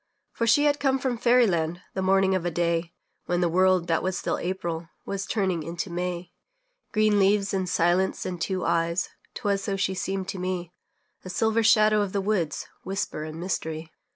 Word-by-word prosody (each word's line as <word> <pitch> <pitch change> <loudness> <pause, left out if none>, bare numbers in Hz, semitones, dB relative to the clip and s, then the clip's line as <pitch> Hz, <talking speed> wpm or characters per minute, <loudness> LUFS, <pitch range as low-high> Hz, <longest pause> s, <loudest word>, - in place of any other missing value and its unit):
For 230 - -1
she 290 +6 +5
had 290 0 +3
come 270 -1 +2
from 255 -3 -2
fairy 245 0 +5
land, 170 -2 -1
The 190 - -2
morning 190 0 +3
of 185 -2 0
a 175 - 0
day 170 0 0 0.4
When 175 0 +1
the 175 - +3
world 185 +1 +3
that 165 -1 +1
still - - -2
was - - -6
April 170 -2 -3 0.2
Was 195 -1 -3
turning 190 -6 0
into 170 +4 -5
May. 175 0 -4 0.6
Green 215 -2 +3
leaves 195 0 +3
and 190 -2 -1
silence 175 +4 +1
and 180 -2 -4
two 185 -1 -1
eyes 170 +1 +1 0.3
'Twas 200 -1 0
so 200 -1 -1
she 190 -1 0
seemed 190 0 -3
to 195 - -4
me; 180 -1 -3 0.5
A 185 - -8
silver 220 +4 +1
shadow 215 -1 +5
of 200 -2 -2
the 200 - +1
woods, 190 -6 -1 0.2
Whisper 195 -4 -3
and 155 +1 -7
mystery. 160 -3 -3
185 Hz, 190 wpm, -26 LUFS, 170-200 Hz, 0.6 s, she